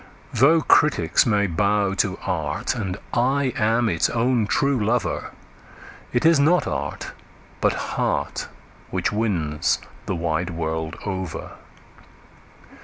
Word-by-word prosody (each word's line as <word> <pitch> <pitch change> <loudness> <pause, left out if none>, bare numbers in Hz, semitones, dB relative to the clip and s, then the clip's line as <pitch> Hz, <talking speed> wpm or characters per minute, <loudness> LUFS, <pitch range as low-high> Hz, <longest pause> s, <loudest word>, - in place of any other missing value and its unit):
Though 160 +5 +5
critics 120 - +3
may 105 -2 +2
bow 100 +2 +1
to 95 -1 0
art, 80 -5 -1
and 100 -6 -3 0.2
I 130 +2 +1
am 115 +2 +2
its 85 -5 +1
own 120 -2 +1
true 140 -1 +1
lover, 115 +1 -1 0.8
It 120 +4 0
is 165 -2 +6
not 165 +5 +4
art, - - -4 0.5
but - - +3
heart, - - -2 0.4
which - - -1
wins 90 -9 0 0.3
the 95 - -1
wide 85 +1 -1
world 80 -1 -3
over. 95 -3 -4
105 Hz, 115 wpm, -23 LUFS, 85-125 Hz, 0.8 s, is